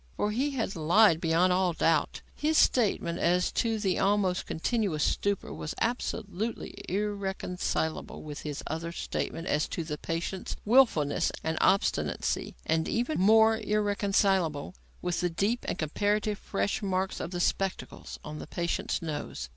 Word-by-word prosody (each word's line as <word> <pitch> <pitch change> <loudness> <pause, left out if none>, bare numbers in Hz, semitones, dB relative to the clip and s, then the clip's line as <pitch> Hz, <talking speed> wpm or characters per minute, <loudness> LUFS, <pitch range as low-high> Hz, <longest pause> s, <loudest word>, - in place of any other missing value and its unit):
For 210 - 0
he 260 +7 0
had 225 -5 -2
lied, 170 +2 +4
beyond 170 +2 +3
all 180 -1 +2
doubt. 165 -1 +1
His 310 +1 0
statement 200 -8 +2
as 180 +1 +2
to 225 -2 0
the 195 -3 0
almost 195 -2 +1
continuous 185 -4 0
stupor 200 -1 0
was 155 - -5
absolutely 230 -2 -2 0.2
irreconcilable 190 -5 -2
with 150 -1 -7
his 150 -2 -5
other 165 +2 -4
statement 165 -1 -4
as 150 -1 +1
to 170 - -3
the 150 -2 -5
patient's 170 +3 -3
wilfulness 210 - +4
and 160 0 -1
obstinacy 75 - +1
and 160 0 +1
even 245 +7 -1
more 220 +3 +5
irreconcilable 200 -7 +1 0.3
with 180 -1 -1
the 180 - +1
deep 200 +8 -1
and - - -2
comparatively 205 +7 0
fresh 200 +1 -2
marks 190 -1 -1
of - - -4
the 175 -1 -4
spectacles 195 +2 -2
on 150 0 -7
the - - -8
patient's 170 0 -2
nose. 155 -2 -5
185 Hz, 145 wpm, -29 LUFS, 165-210 Hz, 0.3 s, more